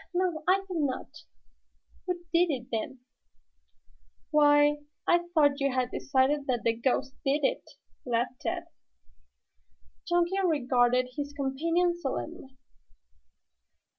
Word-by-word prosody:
"No, 350 -4 0
I 390 +1 +3
think 360 -3 -3
not." 295 +2 -4 0.8
"Who 355 -1 -3
did 345 +1 +4
it, 250 -5 -4
then?" 235 +3 -4 1.3
"Why, 295 -1 +5 0.3
I 345 0 +2
thought 290 -4 +3
you 275 -1 +1
had 255 -1 -1
decided 275 +2 +1
that 245 -3 0
the 230 - +2
ghost 260 +3 -1
did 285 +2 +1
it?" - - -1 0.3
laughed 245 +1 -2
Tad. 345 -1 -2 1.4
Chunky 350 +2 +1
regarded 255 -6 +2
his 290 0 -4
companion 330 +6 0
solemnly. 275 -3 -6
290 Hz, 110 wpm, -28 LUFS, 260-340 Hz, 1.4 s, Why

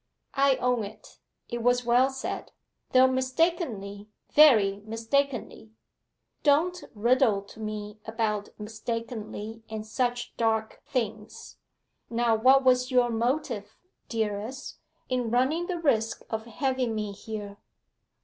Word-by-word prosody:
'I 275 -1 +4
own 250 -3 +1
it 210 +1 -11 0.3
it 240 0 -4
was 245 +1 +2
well 245 +3 +4
said, 265 0 -5 0.4
though 255 0 +7
mistakenly 260 - -1 0.2
very 220 -10 +6
mistakenly.' 225 0 -2 0.7
'Don't 335 +5 +2
riddle 230 -2 +3
to 200 - -15
me 215 0 -5
about 220 -2 -1
mistakenly 225 0 -5
and 215 -1 -5
such 245 +2 -2
dark 220 -1 0
things. 220 -4 -4 0.5
Now 235 0 +2
what 260 +5 +5
was 250 0 +3
your 250 -2 +3
motive, 235 -2 -2 0.3
dearest, 220 +4 -3 0.3
in 250 -2 -1
running 270 +9 +1
the 360 - -2
risk 225 -9 +1
of 220 0 -3
having 255 -1 -1
me 210 -1 -2
here? 205 0 -7
235 Hz, 115 wpm, -27 LUFS, 215-260 Hz, 0.7 s, though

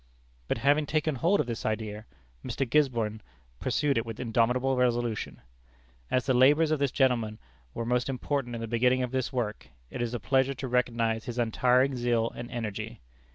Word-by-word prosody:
But - - 0
having 145 +4 +2
taken 155 +1 0
hold 170 +10 +2
of - - +1
this 120 -2 -4
idea, 110 0 -3 0.4
Mr. 135 0 -2
Gisborne 115 -6 +1 0.4
pursued 135 +1 +1
it - - -2
with 115 -2 -7
indomitable 125 +2 +1
resolution. 120 -3 -1 0.7
As 125 - +1
the 130 - +2
labors 145 +5 +5
of 155 - +1
this 140 -1 +2
gentleman 120 -5 +1 0.4
were 115 - -3
most 125 +2 0
important 130 -1 -2
in 115 - -5
the 115 - -4
beginning 125 +3 +2
of 125 - -3
this 130 0 -1
work, 115 -5 -3 0.2
it - - -4
is 120 0 -2
a - - -3
pleasure 135 +4 +1
to 130 +1 -5
recognize 115 -2 0
his 120 -1 -5
untiring 125 +3 +2
zeal 120 -2 +1
and 120 0 -7
energy. 110 -4 -5
125 Hz, 180 wpm, -28 LUFS, 115-135 Hz, 0.7 s, labors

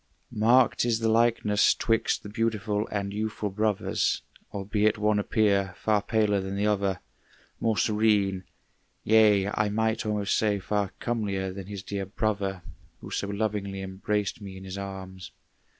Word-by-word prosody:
Marked 120 +4 +4
is 120 -2 +2
the 115 0 -1
likeness 115 -3 +3
'twixt 115 -1 0
the 105 - -8
beautiful 105 -1 -1
And 100 -1 -3
youthful 105 -1 -3
brothers, 105 0 0 0.3
albeit 105 +2 0
one 105 0 +2
appear 100 -3 +1
Far 105 -2 +1
paler 105 -2 +1
than 95 +1 -4
the 100 +1 0
other, 100 -3 0 0.6
more 110 -2 +1
serene; 105 -3 +2 0.6
Yea, 105 -3 +5
I 105 0 0
might 110 +2 0
almost 105 -2 0
say, 105 -2 +2
far 100 0 -1
comelier 100 -5 -2
Than 95 -1 -8
his 100 -2 -7
dear 100 0 -4
brother, 100 -3 -2 0.4
who - - -10
so 100 - -2
lovingly 100 -1 -2
Embraced 100 +2 -2
me 95 -2 -8
in 95 - -10
his 95 0 -7
arms. 95 -2 -7
105 Hz, 150 wpm, -27 LUFS, 100-110 Hz, 0.6 s, Yea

